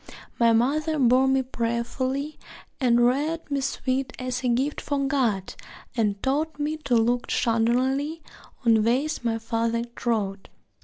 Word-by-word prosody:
My 230 -1 +5
mother 300 +7 +1
bore 260 0 +4
me 265 0 +2
prayerfully 255 +4 -2 0.4
And 240 -3 +4
reared 295 +6 0
me 280 -1 0
sweet 265 -1 -2
as 255 0 -3
a - - +1
gift 265 +5 0
for 280 -1 -1
God, 240 -9 0 0.4
And 210 -4 0
taught 295 +3 0
me 300 +2 -1
to 275 -5 0
look 240 +2 +1
shudderingly 260 +7 +1 0.4
On 225 -2 +5
ways 255 +6 0
my 230 -1 0
father 230 +1 -1
trod. 205 -5 -2
255 Hz, 140 wpm, -25 LUFS, 230-280 Hz, 0.4 s, My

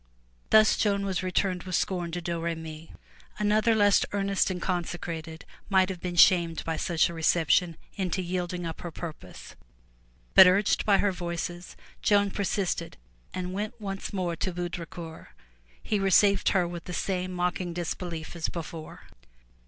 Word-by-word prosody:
'' - - -36
Thus 215 0 +6
Joan 200 -2 +1
was 190 -2 -1
returned 185 0 0
with 185 0 -3
scorn 175 -3 -1
to 175 - -3
Domremy. 165 -2 -4 0.5
Another 215 +2 +3
less 205 -2 +4
earnest 200 -1 +1
and 185 -1 -3
consecrated, 170 -3 -4 0.2
might 190 -1 +4
have 180 -3 -6
been 180 -1 -4
shamed 170 -2 +5
by 165 - -1
such 165 -1 +1
a 170 - -6
reception 165 +1 +2 0.2
into 185 -1 -1
yielding 175 0 -3
up 165 -1 -6
her 175 - -5
purpose. 165 -1 -9 0.8
But 190 - +10
urged 200 +4 +2
by 200 -2 +6
her 205 - +2
Voices, 175 0 -5 0.3
Joan 205 -1 +3
persisted 190 -4 -2 0.3
and 185 0 -4
went 215 +4 -4
once 195 -2 -5
more 180 -4 -2
to 185 - -2
Baudricourt. 170 -2 -6 0.6
He 210 - 0
received 195 0 +4
her 180 -3 +2
with 175 -1 -7
the 180 - -6
same 185 0 -2
mocking 180 0 -2
disbelief 170 -1 -5
as 170 - -2
before. 165 -1 -7
180 Hz, 150 wpm, -27 LUFS, 170-195 Hz, 0.8 s, But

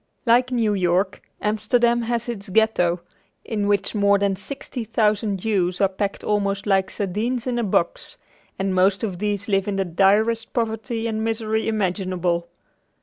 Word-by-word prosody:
Like 245 +2 +4
New 230 -4 +1
York, 190 +1 +1 0.2
Amsterdam 235 +3 +2
has 235 0 -2
its 215 -4 -5
Ghetto, 185 -5 +2 0.4
in 210 -3 -1
which 200 -1 +1
more 200 -1 +4
than 200 -1 +1
sixty 250 +3 -6
thousand 215 -2 +1
Jews 185 -3 0
are 195 - +4
packed 195 +1 -3
almost 200 -1 0
like 195 -2 +2
sardines 225 +5 -2
in 245 -2 -1
a - - 0
box, 185 -4 -1 0.4
and 190 0 -1
most 190 +2 +2
of 190 -5 -3
these 205 -1 -2
live 195 -2 +1
in 205 - -1
the 195 0 0
direst 210 +6 +2
poverty 225 0 -2
and 220 -1 -1
misery 220 -1 -1
imaginable. 185 -4 -1
205 Hz, 155 wpm, -23 LUFS, 195-225 Hz, 0.4 s, Like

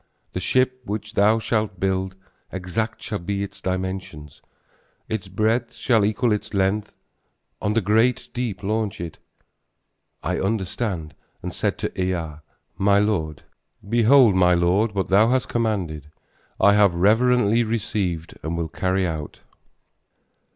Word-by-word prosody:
The - - -2
ship 130 +6 +1
which 105 0 -5
thou 105 +1 +4
shalt 110 -3 -1
build, 95 0 -1 0.4
Exact 95 +5 -3
shall 105 - -3
be 100 +3 -2
its 100 0 -8
dimensions: 95 -6 -4 0.7
Its 110 -4 -3
breadth 110 +5 0
shall 115 -6 +2
equal 110 +3 +1
its 105 0 -2
length; 100 +2 0 0.7
On 105 +1 0
the 115 - +3
great 110 +5 +2
deep 120 -6 -3
launch 105 0 -1
it. 85 -2 -7 1.0
I - - -1
understood 95 -5 -2 0.3
and - - -4
said - - -1
to - - -4
Ea, 85 -5 -2 0.4
my 100 +1 +4
lord: 85 -8 0 0.4
"Behold, 120 +1 +5
my 90 -1 +4
lord, 95 +5 +2
what 95 - -1
thou 105 +4 +5
hast 130 0 +1
commanded, 90 - -2 0.5
I 100 - +6
have 100 -4 +4
reverently 115 +4 +3
received 100 -7 -2
and 80 +1 -3
will 85 -1 -2
carry 95 +3 0
out." 80 -3 -5
100 Hz, 135 wpm, -23 LUFS, 90-110 Hz, 1.0 s, I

